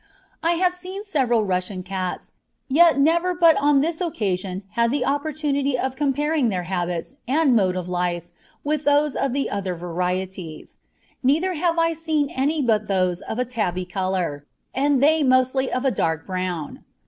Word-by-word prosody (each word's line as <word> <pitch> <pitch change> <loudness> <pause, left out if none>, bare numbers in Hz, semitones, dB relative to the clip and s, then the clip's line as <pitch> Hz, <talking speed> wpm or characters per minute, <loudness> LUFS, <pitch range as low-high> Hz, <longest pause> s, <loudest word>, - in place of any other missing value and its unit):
I 335 +1 +2
have 360 +1 +2
seen 370 +3 -7
several 255 - +1
Russian 185 0 -2
cats, 185 -1 -4 0.4
yet 320 +1 +5
never 340 +5 +3
but 335 -2 +6
on 285 0 +4
this 325 +3 -2
occasion 195 - -2
had 235 0 +2
the 255 0 0
opportunity 285 -2 0
of 260 +1 -2
comparing 290 -1 +1
their 185 -3 -2
habits 175 +5 -3
and 280 -1 +3
mode 190 -4 +2
of 180 -1 -4
life 175 -1 -1 0.4
with 300 0 -1
those 290 0 +2
of 275 - 0
the 275 +2 -1
other 195 -3 -2
varieties; 180 -1 -4 0.4
neither 320 +8 +2
have 335 +1 0
I 330 0 +2
seen 310 -3 -1
any 290 +3 0
but 215 -3 +1
those 185 -2 0
of 220 - -5
a 250 - 0
tabby 195 -7 -2
colour, 180 -6 -2 0.3
and 275 0 +2
they 315 +2 +4
mostly 255 0 +2
of 255 +2 -1
a 265 - +3
dark 160 -7 -1
brown. 180 -4 -4
255 Hz, 165 wpm, -23 LUFS, 185-300 Hz, 0.4 s, but